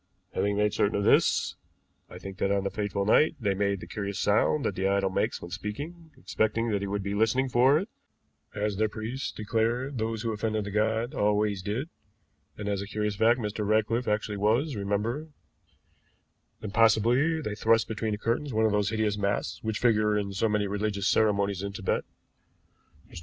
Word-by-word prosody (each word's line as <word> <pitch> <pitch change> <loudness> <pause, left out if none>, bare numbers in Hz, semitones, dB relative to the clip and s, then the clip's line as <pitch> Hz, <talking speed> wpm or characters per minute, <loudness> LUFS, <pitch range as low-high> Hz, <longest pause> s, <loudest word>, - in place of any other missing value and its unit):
Having 100 0 0
made 105 0 +2
certain 100 - +1
of 100 - 0
this, - - +3 0.5
I - - -10
think 95 0 -9
that 100 - +1
on 100 -1 +1
the 100 - -2
fatal 100 -1 -2
night 150 +9 +4
they 100 -5 +1
made 100 0 0
the - - -7
curious 100 -2 -4
sound 110 +8 +2
that - - 0
the 95 +1 -1
idol 100 -1 +1
makes - - -1
when 85 - -9
speaking, 145 - -6
expecting 115 +1 0
that 100 -1 0
he 100 - -2
would 100 0 -2
be 100 +1 -3
listening 110 +5 +2
for 130 +4 +5
it, 190 +6 -2 0.7
as 105 -1 -1
their 110 +1 +1
priests 115 +5 -4
declared 115 +5 -1
those 110 0 -2
who 115 - -1
offended 110 0 -1
the 100 - -6
god 110 +5 0
always 105 -4 +1
did, 110 - -3 0.7
and 105 - -5
as 100 -1 -1
a 100 - -6
curious 105 0 -2
fact 115 +4 +3
Mr. 105 -1 -3
Ratcliffe 110 +3 +1
actually 105 0 -1
was, 115 +8 +1
remember; 105 +9 -2 1.3
then 105 - -5
possibly 115 +8 +3
they 105 -9 -4
thrust 115 +1 +2
between 110 -1 -2
the - - -2
curtains 120 +7 -1
one 110 -1 +2
of 110 - +2
those 105 -1 +1
hideous 110 -2 0
masks 100 -5 -1
which 110 -1 -2
figure 105 -3 +2
in 100 -1 -2
so 110 +3 +1
many 105 -1 +1
religious 100 0 -1
ceremonies 100 -3 +2
in 100 0 -4
Tibet. - - -1 1.0
Mr. - - -10
105 Hz, 190 wpm, -28 LUFS, 100-115 Hz, 1.3 s, for